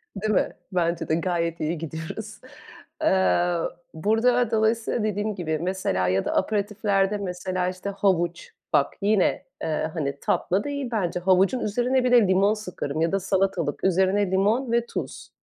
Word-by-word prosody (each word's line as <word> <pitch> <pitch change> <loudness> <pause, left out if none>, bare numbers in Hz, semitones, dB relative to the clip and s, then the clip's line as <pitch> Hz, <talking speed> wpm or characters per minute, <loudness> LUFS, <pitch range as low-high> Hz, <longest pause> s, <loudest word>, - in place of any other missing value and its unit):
Değil 215 +2 -1
mi? - - +2 0.2
Bence 170 -2 0
de. 160 - +2
Gayet 170 -1 -1
iyi 160 +2 -1
gidiyoruz. 165 +7 -6 0.6
Eee, 175 -2 +2 0.4
burada 225 +7 +2
dolayısıyla 225 0 +1
dediğim 210 0 -1
gibi, 160 -4 -2
mesela, 170 - -1
ya 95 +1 +1
da - - -1
aperitiflerde, 205 0 +1
mesela, 185 -1 -2
işte, 185 +2 -5
havuç, 180 -4 0 0.2
bak - - +3
yine, 205 -2 +2 0.2
eee, 155 0 -1
hani, 140 -4 -3
tatlı 190 +3 0
değil 285 -3 -3
bence. 180 -5 -1
Havucun 190 +6 +3
üzerine 245 +5 +1
bir 250 - +1
de 235 -5 +6
limon 195 +3 +3
sıkarım 180 -8 -4
ya 165 - +2
da 195 - +1
salatalık 190 -5 -1
üzerine 190 +1 +2
limon 220 +6 +1
ve 235 0 +2
tuz. - - -6
190 Hz, 150 wpm, -25 LUFS, 175-215 Hz, 0.6 s, de